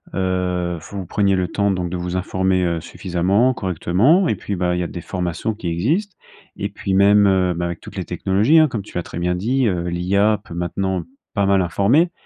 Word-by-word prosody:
Heu, 90 -2 -1
vous 100 -2 -5
preniez 100 +2 +1
le 90 -1 0
temps 100 +3 0
donc 90 -3 -2
de 90 - -2
vous 90 +1 -3
informer, 95 0 0
heu, 85 -2 -1
suffisamment, 95 +9 +1
correctement. 110 - +2
Et - - +2
puis 100 +1 -4
bah, 90 -1 0
il - - -1
y - - 0
a - - -3
des 85 +3 -7
formations 90 +5 -3
qui 105 -4 -7
existent. 150 - -1 0.4
Et 100 0 -3
puis 100 -1 -3
même, 100 +1 +5
heu, 95 -2 +2
bah 85 0 -3
avec 85 -1 -4
toutes - - -12
les - - -4
technologies 105 +11 +2
hein, 155 -1 +6
comme 115 -6 -4
tu 100 - -9
l'as 90 - -1
très 85 - -7
bien 90 +1 0
dit, 120 +7 +1
heu, 90 -4 -1
l'IA 100 +5 +1
peut 85 - -10
maintenant 90 +1 -2 0.3
pas 100 -1 +2
mal 100 -1 +3
informer. 110 - +2
95 Hz, 220 wpm, -20 LUFS, 90-105 Hz, 0.4 s, hein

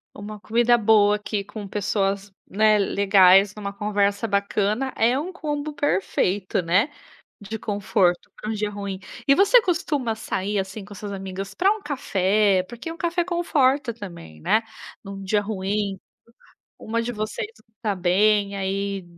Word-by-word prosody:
Uma 210 +1 -8
comida 240 +4 +3
boa 210 -2 +4
aqui 210 0 -3
com 205 +1 -8
pessoas, 200 0 -1 0.2
né, 215 +2 +4
legais, 195 -1 +5
numa 200 -2 -5
conversa 205 +1 0
bacana 205 +5 0
é 235 +3 +3
um 320 +6 -3
combo 300 -4 -4
perfeito, 195 -6 0
né? 185 - +2 0.5
De 215 +2 -6
conforto 200 -4 0
para 215 - -3
dia 210 0 -2
ruim. 200 -2 -5 0.3
E 275 - +6
você 405 - +6
costuma 310 - -1
sair 205 -1 -2
assim 195 +2 -6
com 205 - -13
as 200 - -9
suas 205 - -5
amigas 195 0 -6
para 390 +3 +3
um 430 -1 -7
café? 200 - +1
Porque 245 +8 -7
um - - -10
café 345 +1 0
conforta 290 -7 +1
também, 170 - -10
né. 215 - +2 0.4
Num 195 -1 -8
dia 195 +2 +1
ruim, 200 -1 -2 0.8
uma 230 +1 -2
de 235 +1 -3
vocês 220 - -3 0.2
não 220 - -42
tá 215 -4 0
bem, 200 +3 +2
aí 195 0 -2
205 Hz, 155 wpm, -23 LUFS, 195-235 Hz, 0.8 s, E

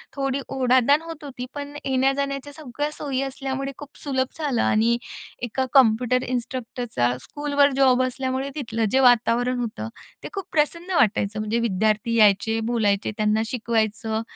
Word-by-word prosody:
थोडी 275 -1 -1 0.2
ओढाताण 260 +3 +4
होत 330 -2 -9
होती. 260 -3 -6
पण 285 0 -7
येण्या-जाण्याच्या 275 +1 0
सगळ्या 295 -1 -4
सोयी 275 -3 -3
असल्यामुळे 270 0 -3
खूप 290 - -10
सुलभ 260 -2 0
झालं 290 -7 0
आणि, 230 +2 +3 0.5
एका 255 +2 -1
कॉम्प्युटर 250 0 +4
इन्स्ट्रक्टरचा 240 - -2
स्कूलवर 285 -1 +1
जॉब 255 -1 +5
असल्यामुळे 260 +1 -2
तिथलं 230 -6 -2
जे 265 - +3
वातावरण 245 0 +3
होतं 215 - -4 0.3
ते - - -6
खूप 390 -3 -4
प्रसन्न 335 +4 0
वाटायचं 215 -4 +2
म्हणजे 215 +2 -1
विद्यार्थी 215 +1 +1
यायचे, 220 +1 +4
बोलायचे, 205 -3 +1
त्यांना 215 0 +2
शिकवायचं 220 -2 -1
255 Hz, 140 wpm, -23 LUFS, 225-275 Hz, 0.5 s, जॉब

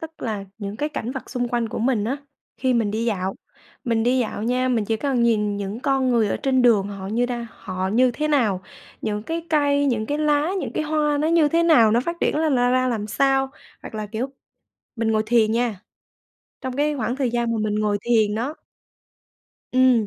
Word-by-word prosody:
tức 320 0 -9
là 215 -4 -3
những 200 -1 -5 0.2
cảnh 230 - -3
vật 265 - -7
xung 245 -2 -1
quanh 235 -1 -1
của - - -5
mình 230 -3 +1
á 250 +5 -1 0.4
khi 255 -1 +1
mình 225 -3 +1
đi 220 +2 -2
dạo 195 -4 -1 0.5
mình 230 -3 +1
đi 250 +3 +2
dạo 220 -3 -2
nha, 250 +3 +1
mình 235 -4 +1
chỉ 220 +2 0
cần 260 0 0
nhìn 210 -3 +2
những 200 +3 -4
con 265 -1 +1
người 230 -3 +3
ở - - 0
trên 260 -2 +1
đường 215 -5 +4
họ 195 -2 -7
như 235 +4 +1
đang 240 -1 -4
họ 185 -2 -4
như 250 +5 +3
thế 305 +5 -2
nào, 220 -11 +2 0.4
những 210 -1 -2
cái 330 +6 -4
cây, 285 -2 +3
những 225 -5 0
cái 290 +4 -2
lá, 300 +1 +2
những - - -4
cái - - -1
hoa 300 -1 +1
nó 300 - +1
như 330 -2 +4
thế 335 +3 +2
nào, 270 -10 +6
nó 230 +2 +3
phát 340 +7 -3
triển - - +1
là 315 +1 +2
ra 245 -2 +3
ra 255 0 +2
làm 220 -4 -2
sao. 270 +5 +1 0.3
Hoặc - - -9
là, 215 -1 -3
kiểu, 220 +4 -3 0.7
mình 225 -1 0
ngồi 215 - +2
thiền 220 -1 +3
nha, 230 -4 0 0.8
trong 260 -1 -5
cái 295 +1 +1
khoảng 240 0 -2
thời 265 -3 0
gian 235 0 0
mà 230 - -1
mình 210 -1 -1
ngồi 210 -1 +1
thiền 220 -3 +2
đó 245 +7 -2 1.2
ừm, 255 -4 +4
240 Hz, 220 wpm, -23 LUFS, 215-270 Hz, 1.2 s, nào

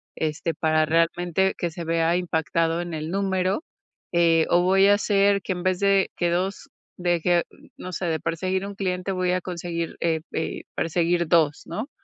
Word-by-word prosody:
Este, 160 +1 -2
para 155 -1 +2
realmente, 175 +3 +1
que 175 - -1
se 170 +1 -7
vea 165 +1 +1
impactado 165 -1 0
en 175 -1 -6
el 155 +2 -4
número. 190 - 0 0.5
Eh, 165 -2 +4
"O, 175 +1 +4
voy 195 +2 +4
a 205 - +6
hacer, 200 -1 +2
que - - -3
en 180 -1 -6
vez 185 -1 +1
de 195 -1 +3
que 175 - +1
2 185 +3 -2 0.3
deje", 175 -1 +2 0.3
no 185 - -7
sé. 180 - -3
"De 160 -1 0
perseguir 185 +4 -2
1 200 0 -7
cliente, 185 -1 -2
voy 185 -1 0
a 185 - 0
conseguir, 170 -2 -4
eh 165 -2 +1
eh, 160 - -3
perseguir 170 +1 0
2", 155 -3 +2
¿no? 225 +8 -5
175 Hz, 180 wpm, -24 LUFS, 165-190 Hz, 0.5 s, a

